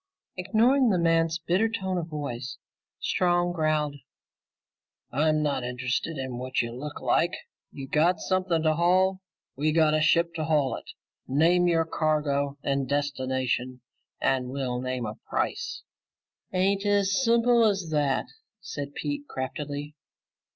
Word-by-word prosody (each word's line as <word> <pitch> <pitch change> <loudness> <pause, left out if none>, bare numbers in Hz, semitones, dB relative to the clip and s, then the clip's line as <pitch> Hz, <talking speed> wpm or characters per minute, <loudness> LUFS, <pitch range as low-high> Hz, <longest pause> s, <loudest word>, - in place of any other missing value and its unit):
Ignoring 230 +8 +3
the 190 - +2
man's 165 -1 +2
bitter 180 +6 +1
tone 190 -5 -2
of 165 - -4
voice, 135 -5 -5 0.4
Strong 175 -1 +1
growled, 155 -3 0 1.1
"I'm 155 +3 +2
not 140 -4 0
interested 125 +5 -2
in 130 -2 -4
what 130 +1 -2
you 115 -1 0
look 145 +4 -6
like. 175 +2 +2 0.4
You 135 -1 -8
got 160 +5 +2
something 185 -3 0
to 155 -1 +3
haul; 185 +3 +2 0.3
we 150 +3 +1
got 155 -1 +4
a 155 - +2
ship 170 +2 +3
to 155 - -1
haul 145 -6 +2
it. - - -10 0.4
Name 170 +6 +3
your 165 -1 +2
cargo 150 -3 0
and 135 -2 -1
destination, 130 -3 -1 0.4
and 130 -2 +1
we'll 130 -2 -2
name 130 -1 -3
a 105 0 -6
price." 485 0 -2 0.7
"Ain't 195 +2 +1
as 205 +3 +2
simple 235 0 +4
as 195 -6 +1
that," 145 -3 +1 0.3
said 145 -6 -6
Pete 290 0 -4
craftily. 145 +2 -5
155 Hz, 135 wpm, -27 LUFS, 140-180 Hz, 1.1 s, got